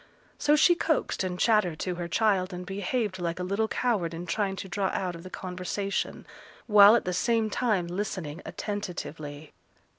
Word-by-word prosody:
So 295 +1 +4
she 330 +4 +6
coaxed 315 - 0
and 180 -1 -3
chattered 210 -7 +2
to 180 - -1
her 175 -1 -4
child 190 0 +1
and 180 0 -6
behaved 200 +1 -2
like 170 0 -2
a - - -2
little 200 +4 0
coward 205 -10 0
in 170 +2 -6
trying 195 +1 -1
to 190 - -6
draw 195 +1 -1
out 185 -2 -1
of 170 - -9
the 185 - -9
conversation, 185 +2 -3 0.4
while 210 0 +8
at 235 - +1
the 180 - -1
same 225 +2 +1
time 210 -8 +1
listening 175 -3 -4
attentively. 155 -7 -6
190 Hz, 175 wpm, -28 LUFS, 180-215 Hz, 0.4 s, while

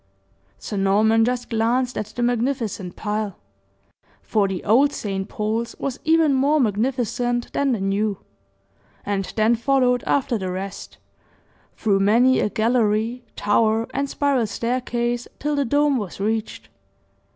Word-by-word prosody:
Sir 205 - -6
Norman 215 +3 +3
just 245 0 -2
glanced 240 +3 +1
at 210 - -3
the 240 +3 -4
magnificent 235 -6 -1
pile 210 -2 -3 0.9
for 210 -3 +1
the 190 -2 -4
old 265 +7 +4
St. 195 -1 -4
Paul's 220 +2 -2
was 270 -2 -4
even 320 -2 +3
more 280 +3 +3
magnificent 245 +1 -1
than 280 -1 +1
the 230 - 0
new, 200 +1 0 0.9
and 195 -2 -2
then 220 +1 +3
followed 250 +1 +2
after 250 -5 +1
the 185 -1 -3
rest, 190 +1 -6 0.8
through 200 -3 +1
many 235 +6 +4
a - - +1
gallery, 225 +1 +1
tower, 220 +2 +2
and 275 +1 -1
spiral 275 -6 +1
staircase 240 +1 -2
till 295 +1 -1
the 285 -1 +1
dome 285 +2 +2
was 200 -6 -5
reached. 220 +2 -3
230 Hz, 135 wpm, -22 LUFS, 210-255 Hz, 0.9 s, old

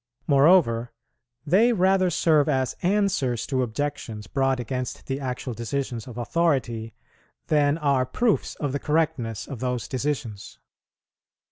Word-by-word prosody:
Moreover, 140 -6 +4 0.5
they 210 +10 +4
rather 190 -2 +3
serve 155 -3 +3
as 130 -3 0
answers 185 - +1
to 130 -2 -1
objections 120 -3 -4
brought 135 +4 0
against 125 +1 -4
the 135 0 -3
actual 125 -1 -4
decisions 120 0 -4
of 120 -2 -9
authority, 120 -6 -1 0.5
than 145 0 +3
are 140 -5 +1
proofs 225 - 0
of 145 -3 -3
the 140 - -2
correctness 150 -9 -1
of 135 - -7
those 125 -4 -2
decisions. 130 -6 -4
135 Hz, 125 wpm, -25 LUFS, 120-155 Hz, 0.5 s, Moreover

